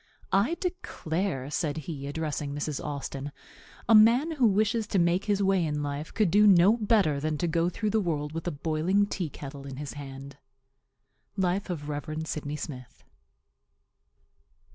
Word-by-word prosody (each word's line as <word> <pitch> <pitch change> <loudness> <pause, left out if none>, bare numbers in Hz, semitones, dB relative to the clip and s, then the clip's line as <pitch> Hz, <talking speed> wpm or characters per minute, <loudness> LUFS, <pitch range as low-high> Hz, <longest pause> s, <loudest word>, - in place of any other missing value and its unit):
"I 210 - +3
declare," 175 - -3
said 150 -1 -1
he, 140 -5 -5
addressing 145 -1 -3
Mrs. 145 0 -3
Austin, 140 -1 -5 0.6
"a 230 - +5
man 235 +9 +6
who 270 -7 +3
wishes 215 +2 +1
to 200 - 0
make 175 +2 +2
his 205 -2 +1
way 190 -2 +3
in 150 -2 -1
life 145 +2 -4
could 210 -6 +1
do 210 +2 +6
no 195 +2 +6
better 205 -10 +2
than 155 +1 -1
go 170 +1 +1
through 210 +4 -2
the 220 - +2
world 150 -6 -2
with 165 +2 -5
a - - +1
boiling 160 +7 +1
tea 185 -5 -3
kettle 140 -1 -9
in 135 - -7
his 145 +1 -6
hand." 140 -1 -9 1.0
Life 190 +1 0
of 150 -5 -4
Rev. 155 +2 -4
Sydney 150 -2 -4
Smith. 130 -5 -8
_DR. - - -37
165 Hz, 165 wpm, -28 LUFS, 145-200 Hz, 1.0 s, man